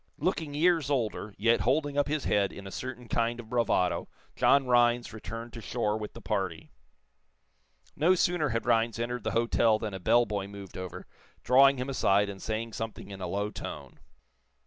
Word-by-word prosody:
Looking 160 Hz, -5 st, -2 dB
years 160 Hz, -2 st, +3 dB
older, 110 Hz, -6 st, -2 dB
yet 115 Hz, +3 st, +3 dB
holding 145 Hz, +3 st, +1 dB
up 145 Hz, 0 st, +2 dB
his 150 Hz, -1 st, -1 dB
head 100 Hz, -1 st, +1 dB
in 100 Hz, -, -10 dB
a 95 Hz, -, -7 dB
certain 125 Hz, 0 st, -6 dB
kind 115 Hz, +1 st, 0 dB
of 115 Hz, -2 st, -9 dB
bravado, 115 Hz, -7 st, +1 dB, 0.3 s
John 140 Hz, -1 st, +4 dB
Rhinds 120 Hz, -1 st, +3 dB
returned 115 Hz, +3 st, -7 dB
to 115 Hz, -, -7 dB
shore 110 Hz, -2 st, -1 dB
with 105 Hz, -1 st, -5 dB
the 115 Hz, -, -11 dB
party. 95 Hz, -5 st, -3 dB, 1.2 s
No 170 Hz, +6 st, +4 dB
sooner 175 Hz, -4 st, +1 dB
had 115 Hz, -1 st, -2 dB
Rhinds 115 Hz, -2 st, +2 dB
entered 120 Hz, 0 st, -3 dB
the 110 Hz, -, -2 dB
hotel 115 Hz, -1 st, +3 dB
than 110 Hz, -2 st, -5 dB
a 95 Hz, -, -5 dB
bell 120 Hz, +6 st, +4 dB
boy 100 Hz, -2 st, -3 dB
moved 100 Hz, -2 st, -10 dB
over, 95 Hz, -1 st, -7 dB, 0.4 s
drawing 135 Hz, +2 st, +6 dB
him 125 Hz, +1 st, -3 dB
aside 100 Hz, -6 st, +2 dB
and 95 Hz, -1 st, -8 dB
saying 110 Hz, +1 st, -3 dB
something 110 Hz, -2 st, -6 dB
in 95 Hz, -1 st, -8 dB
a 90 Hz, -, -3 dB
low 100 Hz, +3 st, -2 dB
tone. -, -, -8 dB
115 Hz, 185 wpm, -29 LUFS, 105-130 Hz, 1.2 s, drawing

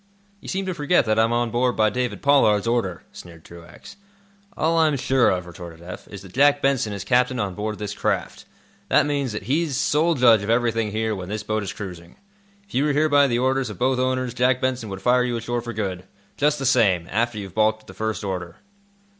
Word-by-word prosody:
"You -, -, -14 dB
seem 195 Hz, 0 st, -2 dB
to 185 Hz, -, -2 dB
forget 150 Hz, -2 st, +2 dB
that 110 Hz, 0 st, +1 dB
I'm 115 Hz, +1 st, +3 dB
on 120 Hz, -1 st, 0 dB
board 125 Hz, +1 st, +1 dB
by 110 Hz, -1 st, +2 dB
David 125 Hz, -1 st, -3 dB
Pollard's 125 Hz, -8 st, +4 dB
order," 115 Hz, -7 st, -1 dB
sneered 85 Hz, -2 st, -13 dB
Truax. 85 Hz, -, -13 dB, 0.6 s
"All 165 Hz, +1 st, +1 dB
I 160 Hz, -, +5 dB
am 150 Hz, -2 st, 0 dB
sure 130 Hz, -1 st, +2 dB
of," 90 Hz, -1 st, -1 dB
retorted 85 Hz, -1 st, -10 dB
Eph, 90 Hz, +2 st, -10 dB
"is 100 Hz, -1 st, -10 dB
that 95 Hz, -, -13 dB
Jack 145 Hz, +2 st, +4 dB
Benson 135 Hz, -6 st, 0 dB
is 100 Hz, -1 st, -5 dB
captain 125 Hz, +3 st, +1 dB
on 100 Hz, -3 st, -2 dB
board 105 Hz, +2 st, -4 dB
this 105 Hz, -1 st, -5 dB
craft. 100 Hz, -5 st, -3 dB, 0.4 s
That -, -, +4 dB
means 140 Hz, -4 st, -1 dB
that 105 Hz, -, -5 dB
he's 140 Hz, -, 0 dB
sole 160 Hz, +5 st, +2 dB
judge 120 Hz, -5 st, +5 dB
of 100 Hz, -, -5 dB
everything 115 Hz, -2 st, +1 dB
here 110 Hz, +1 st, -2 dB
when 90 Hz, -1 st, -7 dB
this 105 Hz, +1 st, -4 dB
boat 110 Hz, 0 st, -1 dB
is 100 Hz, -, -4 dB
cruising. 90 Hz, -4 st, -9 dB, 0.5 s
If -, -, -19 dB
you 135 Hz, +3 st, +1 dB
were 150 Hz, -, +1 dB
here 155 Hz, +2 st, +2 dB
by 145 Hz, -1 st, +5 dB
the 120 Hz, -2 st, 0 dB
orders 130 Hz, 0 st, 0 dB
of 105 Hz, -, -8 dB
both 130 Hz, 0 st, +1 dB
owners, 130 Hz, -1 st, -1 dB
Jack 125 Hz, +1 st, +2 dB
Benson 130 Hz, -4 st, -2 dB
would 95 Hz, 0 st, -7 dB
fire 125 Hz, 0 st, +3 dB
you 120 Hz, -1 st, -1 dB
ashore 120 Hz, +1 st, -3 dB
for 120 Hz, 0 st, -6 dB
good, 95 Hz, -5 st, -4 dB, 0.3 s
just 150 Hz, +1 st, +1 dB
the 135 Hz, -, -4 dB
same, 100 Hz, -9 st, +3 dB
after 115 Hz, +2 st, 0 dB
you've 100 Hz, -3 st, -7 dB
balked 110 Hz, 0 st, +1 dB
at -, -, -25 dB
the -, -, -12 dB
first 110 Hz, -1 st, -3 dB
order." 90 Hz, -3 st, -4 dB
115 Hz, 230 wpm, -23 LUFS, 100-130 Hz, 0.6 s, I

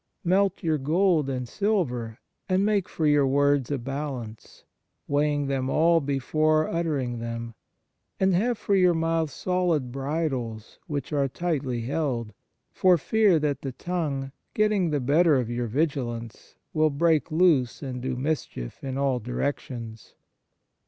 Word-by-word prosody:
" -, -, -51 dB
Melt 190 Hz, +1 st, +2 dB
your 160 Hz, -2 st, +1 dB
gold 160 Hz, +1 st, +2 dB
and 125 Hz, -2 st, -3 dB
silver, 125 Hz, -, -1 dB, 0.3 s
and 190 Hz, +2 st, +2 dB
make 205 Hz, -3 st, +1 dB
for 160 Hz, -, -2 dB
your 145 Hz, -2 st, +4 dB
words 140 Hz, -1 st, +2 dB
a 145 Hz, -, 0 dB
balance 130 Hz, -4 st, -6 dB, 0.2 s
" -, -, -52 dB
weighing 145 Hz, 0 st, +1 dB
them 135 Hz, -1 st, -1 dB
all 165 Hz, +2 st, +4 dB
before 155 Hz, +3 st, +1 dB
utter 165 Hz, -3 st, -1 dB
ing 120 Hz, -3 st, -3 dB
them 115 Hz, 0 st, -5 dB, 0.7 s
"and 190 Hz, 0 st, +3 dB
have 230 Hz, +6 st, +1 dB
for 205 Hz, -, -1 dB
your 180 Hz, -3 st, +4 dB
mouth 165 Hz, -1 st, 0 dB
solid 170 Hz, -4 st, 0 dB
bridles 135 Hz, -6 st, -3 dB
which 145 Hz, -1 st, -4 dB
are 140 Hz, -2 st, +2 dB
tightly 135 Hz, -5 st, -2 dB
held," 125 Hz, -4 st, -2 dB, 0.4 s
for 185 Hz, -2 st, +4 dB
fear 205 Hz, +3 st, +3 dB
that 150 Hz, -2 st, -1 dB
the 135 Hz, -2 st, -5 dB
tongue, 145 Hz, -5 st, -3 dB, 0.2 s
getting 210 Hz, -5 st, +2 dB
the 150 Hz, -2 st, 0 dB
better 150 Hz, +5 st, +4 dB
of 125 Hz, -3 st, 0 dB
your 120 Hz, 0 st, -2 dB
vigilance, 120 Hz, -4 st, -3 dB, 0.2 s
will 155 Hz, 0 st, +3 dB
break 155 Hz, +1 st, +1 dB
loose 155 Hz, -7 st, +2 dB
and 125 Hz, -2 st, -5 dB
do 130 Hz, 0 st, -2 dB
mischief 130 Hz, -, -4 dB
in 135 Hz, -1 st, -3 dB
all 135 Hz, -2 st, +1 dB
direc 125 Hz, +5 st, -2 dB
tions. 115 Hz, -3 st, -9 dB
145 Hz, 150 wpm, -26 LUFS, 125-165 Hz, 0.7 s, your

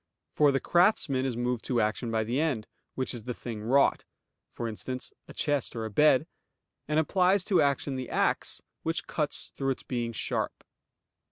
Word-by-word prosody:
For 145 Hz, -2 st, +5 dB
the 135 Hz, -, +1 dB
craftsman 155 Hz, -8 st, +3 dB
is 120 Hz, -3 st, -3 dB
moved 120 Hz, -1 st, -1 dB
to 125 Hz, -2 st, +1 dB
action 110 Hz, +2 st, 0 dB
by 110 Hz, -1 st, +1 dB
the 120 Hz, +5 st, -1 dB
end, 135 Hz, -10 st, 0 dB, 0.3 s
which 130 Hz, 0 st, -1 dB
is 115 Hz, -3 st, -7 dB
the 125 Hz, -1 st, -3 dB
thing 115 Hz, -3 st, -6 dB
wrought, 135 Hz, +6 st, +3 dB, 0.5 s
for 120 Hz, -, -4 dB
instance 125 Hz, +3 st, -5 dB
a -, -, -10 dB
chest 145 Hz, -5 st, 0 dB
or 115 Hz, -1 st, -3 dB
a 110 Hz, -, -5 dB
bed; 150 Hz, +4 st, +5 dB, 0.6 s
and 155 Hz, +1 st, +2 dB
applies 185 Hz, +4 st, +3 dB
to 190 Hz, -2 st, +3 dB
action 140 Hz, -1 st, +1 dB
the 130 Hz, -1 st, -5 dB
axe -, -, 0 dB, 0.2 s
which 165 Hz, 0 st, -2 dB
cuts 150 Hz, -2 st, -3 dB
through 135 Hz, -1 st, -1 dB
its 135 Hz, -, -2 dB
being 120 Hz, -2 st, -2 dB
sharp. 115 Hz, -, -3 dB
130 Hz, 180 wpm, -29 LUFS, 115-150 Hz, 0.6 s, For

